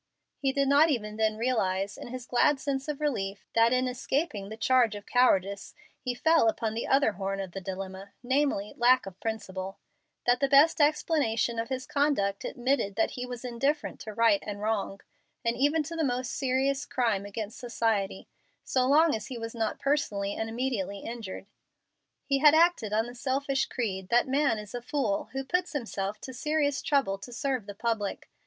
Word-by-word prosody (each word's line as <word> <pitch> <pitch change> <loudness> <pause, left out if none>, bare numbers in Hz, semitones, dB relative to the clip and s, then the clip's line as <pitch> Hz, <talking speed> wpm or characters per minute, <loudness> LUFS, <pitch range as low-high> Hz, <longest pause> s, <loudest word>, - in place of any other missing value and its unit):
He 270 -1 +1
did 275 0 +1
not 290 +4 +5
even 210 -7 -2
then 220 -1 +1
realize, 200 -5 0
in - - -9
his 250 0 -7
glad 270 +4 +3
sense 270 0 -2
of 300 -2 -3
relief, 200 -9 -2
that 230 +1 +4
in 255 0 +2
escaping 250 - -2
the 220 - -7
charge 245 -2 +3
of 205 - -8
cowardice 200 -6 +2 0.2
he 250 -1 -3
fell 320 -1 +4
upon 220 0 -2
the 230 - -3
other 270 -4 +4
horn 195 0 -3
of 190 -2 -5
the 195 - -6
dilemma, 190 +1 -6
namely, 260 -5 0
lack 250 +2 +4
of 190 -2 -10
principle 195 -4 -4 0.5
that 245 0 +3
the 275 - +1
best 295 +3 +6
explanation 290 -6 +1
of 230 - -3
his 260 -1 -3
conduct 280 -10 0
admitted 245 -5 -1
that 220 - +1
he 250 0 -5
was 245 0 -7
indifferent 275 +5 -1
to 215 - -7
right 215 -1 +4
and 205 -1 -5
wrong, 210 -2 -2 0.4
and 230 0 +1
even 290 +4 +2
to 330 +3 -6
the 325 - 0
most 250 -2 -1
serious 270 +1 0
crime 225 -6 0
against 210 +4 -6
society, 225 -6 -1 0.4
so 255 -1 +1
long 310 +3 +5
as 220 - -3
he 255 - -6
was 225 0 -6
not 225 -2 -2
personally 210 -9 0
and 220 +1 -3
immediately 225 -5 -2
injured. 225 -5 -6 0.8
He 275 -1 +1
had 300 +1 +7
acted 330 -10 +3
on 220 +1 +2
the 240 - -8
selfish 270 +2 -1
creed 190 -6 -3
that 240 +1 +4
a - - -10
man 275 -4 +2
is 210 -1 -9
a 245 - -4
fool 240 -6 -1
who 270 0 -2
puts 360 +6 -1
himself 215 -6 -3
to 260 - -7
serious 290 +1 0
trouble 270 -10 +1
to 245 - -10
serve 255 -3 -2
the 205 - -7
public. 220 -2 -2
240 Hz, 190 wpm, -28 LUFS, 205-275 Hz, 0.8 s, had